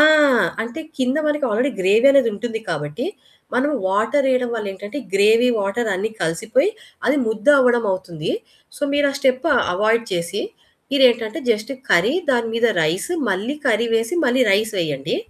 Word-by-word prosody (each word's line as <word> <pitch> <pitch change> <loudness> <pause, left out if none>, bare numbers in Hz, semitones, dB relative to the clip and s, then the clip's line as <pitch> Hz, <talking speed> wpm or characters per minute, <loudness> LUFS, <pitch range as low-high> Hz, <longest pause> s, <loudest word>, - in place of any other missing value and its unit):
ఆ! - - +8 0.6
అంటే 235 +8 -7 0.2
కింద 255 +2 0
మనకి 295 -1 -1
ఆల్రెడీ 245 +7 +1
గ్రేవీ 210 +8 +4
అనేది 270 -4 +4
ఉంటుంది 225 +1 -5
కాబట్టి 150 - -4 0.5
మనం 275 +5 +1 0.2
వాటరేయడం 250 +5 +1
వల్ల 220 -2 -4
ఏంటంటే 205 +8 -8 0.2
గ్రేవీ 220 +5 +4
వాటర్ 210 +4 -2
అన్ని 210 +4 -2
కలిసిపోయి 225 - 0 0.4
అది 270 - +2
ముద్ద 220 +1 -5
అవ్వడం 240 -3 +3
అవుతుంది. 175 -3 -5 0.5
సో - - -11
మీరు 285 0 +2
ఆ - - -10
స్టెప్ 260 +3 +1 0.3
అవాయిడ్ 220 +4 +1
చేసి 170 +2 -2 0.5
మీరు 275 -2 +4
ఏంటంటే 230 +6 -4
జస్ట్ 220 +3 -1 0.2
కర్రీ 175 - +3 0.2
దాని 235 -3 +1
మీద 230 +1 +2 0.2
రైసు 180 - -1 0.2
మళ్ళీ 205 +9 -2
కర్రీ 230 -1 +2
వేసి 225 +6 0
మళ్ళీ 255 +1 +3
రైస్ 215 +3 +2
వేయండి. 145 -6 -2
225 Hz, 155 wpm, -20 LUFS, 195-255 Hz, 0.6 s, ఆ